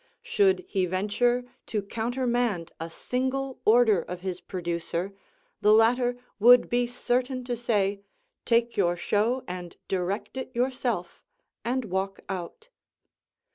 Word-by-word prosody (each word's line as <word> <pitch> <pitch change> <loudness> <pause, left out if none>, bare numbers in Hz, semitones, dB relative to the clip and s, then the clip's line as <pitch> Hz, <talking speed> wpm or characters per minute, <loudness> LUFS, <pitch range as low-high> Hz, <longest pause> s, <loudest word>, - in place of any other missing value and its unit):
Should 400 -6 +2
he 190 - 0
venture 210 +7 +1 0.2
to 210 -2 -2
countermand 235 -4 -1
a 165 +1 -4
single 260 +7 -2
order 220 -4 +5
of 180 +2 -7
his 185 -1 -4
producer, 175 +1 -3 0.5
the 210 - +5
latter 245 +3 +4 0.2
would 245 +3 +7
be 245 0 +2
certain 250 +1 -1
to 245 -1 -2
say 205 -4 0 0.4
"Take 235 0 +2
your 175 -3 +2
show 225 +8 +1
and 180 -1 -6
direct 195 +6 -2
it 260 - -4
yourself," 245 -7 -1 0.4
and 250 +1 -1
walk 190 0 -2
out. 190 - -6
225 Hz, 125 wpm, -27 LUFS, 190-245 Hz, 0.5 s, would